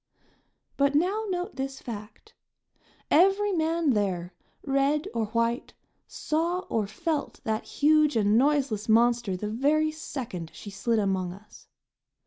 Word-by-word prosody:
But 280 0 +2
now 385 +8 +1
note 355 -6 -3
this 270 0 -4
fact 230 - -9 0.8
every 390 +5 +4
man 325 -3 +1
there, 185 -5 -1 0.3
red 280 +4 +1
or 225 -2 -1
white, 230 +2 -1 0.3
saw 335 +4 -1
or 215 -3 0
felt 310 - -3
that 220 0 -2
huge 305 -1 +3
and 210 -1 +3
noiseless 260 -5 +1
monster 230 -3 +3
the 210 - -4
very 300 +6 +2
second 250 - -6
she 205 - -9
slid 225 +4 0
among 190 -3 0
us. 205 +3 -16
265 Hz, 125 wpm, -27 LUFS, 215-310 Hz, 0.8 s, every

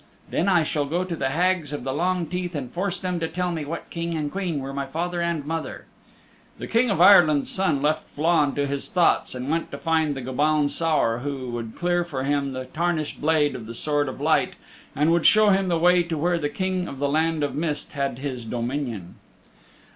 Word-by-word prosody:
Then 180 - +1
I 175 -4 +4
shall 150 -1 -1
go 175 +5 0
to 180 -2 -4
the 135 -4 -1
Hags 175 0 +1
of 145 -4 -5
the 135 0 -2
Long 180 +3 0
Teeth 180 0 -4
and 130 -4 -4
force 185 +1 -2
them 180 -2 -2
to 165 - -1
tell 180 +2 -2
me 160 -3 -3
what 165 +3 -6
King 170 0 -3
and 150 -2 -2
Queen 180 -6 -2
were 135 0 -6
my 140 0 -3
father 175 +4 -2
and 170 -4 -1
mother." 165 +1 -4 0.7
The - - -6
King 235 +2 +2
of 195 - 0
Ireland's 175 -6 +6
Son 160 -8 0
left 155 +1 0
Flann 155 -2 +2
to 145 - 0
his 140 0 -3
thoughts 175 -6 +2
and 125 +1 -5
went 165 +3 -1
to - - -6
find 160 -3 +1
the 135 - -5
Gobaun 145 +3 +1
Saor 150 -8 +1
who 130 -2 -4
would 115 -2 -5
clear 175 0 +1
for 140 -6 -4
him 140 -1 0
the 130 0 -5
tarnished 160 +2 -2
blade 150 -1 +2
of 115 -3 -7
the 115 - -7
Sword 145 +1 0
of 130 - -8
Light 155 0 +2 0.4
and 150 +3 +3
would 170 -1 +4
show 215 -1 +6
him 195 -1 +3
the 170 -2 +1
way 180 +2 +4
to 170 -2 -3
where 170 +3 +1
the 145 -2 -1
King 185 +3 -2
of 140 - -7
the 140 +1 0
Land 160 +1 +1
of 145 - -1
Mist 150 -2 -3
had 140 -4 -2
his 130 -3 -5
dominion. 120 -4 -4
155 Hz, 220 wpm, -24 LUFS, 140-175 Hz, 0.7 s, Ireland's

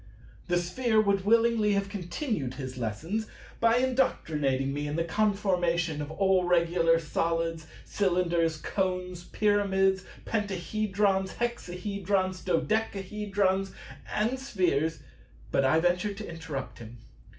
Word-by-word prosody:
The 175 0 +2
Sphere 220 +6 +1
would 200 -2 +1
willingly 225 -1 +4
have 200 0 0
continued 190 - -3
his 130 -2 -6
lessons 155 - -3 0.3
by 230 0 +4
indoctrinating 150 - +1
me 145 +1 -3
in 145 - -3
the 165 - +1
conformation 175 -5 +1
of 145 - -5
all 190 +3 +2
regular 170 -1 +3
Solids, 165 0 -1 0.2
Cylinders, 175 -4 +1
Cones, 180 0 -2
Pyramids, 195 -2 +2 0.2
Pentahedrons, 200 -1 0
Hexahedrons, 195 -4 -2
Dodecahedrons, 195 0 0 0.4
and 230 +5 0
Spheres: 180 - 0 0.5
but 135 - +2
I 135 +4 +4
ventured 180 +4 0
to 215 - -6
interrupt 150 -7 -6
him. 120 +1 -10
185 Hz, 110 wpm, -28 LUFS, 165-205 Hz, 0.5 s, willingly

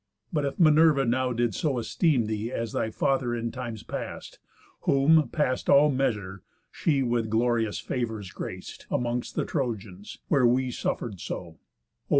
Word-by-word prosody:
But 150 -3 +1
if 140 - -4
Minerva 155 -3 +5
now 130 +2 +1
did 120 -2 0
so 140 - -1
esteem 130 - +1
Thee, 110 +2 -3
as 115 -3 -3
thy 110 - -1
father 125 +1 0
in 115 0 -3
times 115 -3 -6
past; - - -7 0.4
whom, 145 0 +4
past 130 -3 -1
All 145 +1 +6
measure, 105 -8 -1 0.3
she 140 -5 +1
with 120 -2 0
glorious 115 -1 +1
favours 110 -6 -4
grac't - - -7
Amongst 120 0 -2
the - - 0
Trojans, 110 - -4
where 135 -5 +4
we 125 +1 +1
suffer'd 105 -4 -3
so; - - -4
(O! 80 - -20
120 Hz, 155 wpm, -27 LUFS, 110-135 Hz, 0.4 s, All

